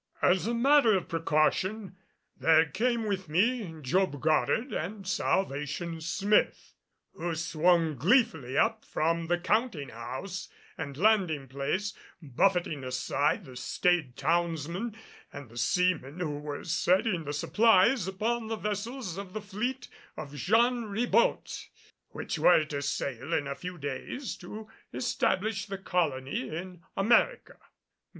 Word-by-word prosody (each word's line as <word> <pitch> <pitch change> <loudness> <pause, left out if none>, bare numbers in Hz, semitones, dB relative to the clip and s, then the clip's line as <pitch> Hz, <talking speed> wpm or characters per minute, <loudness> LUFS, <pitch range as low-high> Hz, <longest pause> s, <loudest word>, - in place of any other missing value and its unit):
As 185 +3 +3
a 235 - 0
matter 245 -3 +5
of 180 - -5
precaution 185 +5 0 0.4
there 160 0 +4
came 230 +7 0
with 195 -5 -3
me 205 +4 +1
Job 145 +2 +1
Goddard 160 - +1
and 195 +4 -4
Salvation 165 -2 -1
Smith 195 +6 +1 0.4
who 170 0 -3
swung 165 0 +2
gleefully 160 - +2
up - - +2
from 165 +1 -1
the 175 +1 +2
counting 185 - 0
house 130 - -6 0.3
and 140 -4 -6
landing 180 -8 +2
place, 140 +10 -2 0.3
buffeting 160 0 0
aside 140 - 0
the 130 -2 -12
staid 155 0 0
townsmen 170 - -1 0.4
and 140 -4 -9
the 120 - -13
seamen 180 +2 +1
who 150 -5 -2
were 145 -1 -6
setting 180 +2 +1
the 145 - -3
supplies 210 - +3
upon 220 +4 -1
the 225 - -2
vessels 210 -1 -4
of 195 -2 -8
the 215 - -3
fleet 215 +6 -4 0.3
of 145 - -7
Jean 230 - +2
Ribault 240 - 0 0.4
which - - -5
were 160 -3 +5
to 145 -2 -4
sail 140 +1 -2
in 145 - 0
a 140 - -3
few 180 +5 -7
days 145 - -5
to 210 +5 -9 0.2
establish 210 -3 -1
the 195 -1 -4
colony 140 -9 -1
in 175 +2 -7 0.2
America. 235 - +2
180 Hz, 130 wpm, -29 LUFS, 150-210 Hz, 0.4 s, matter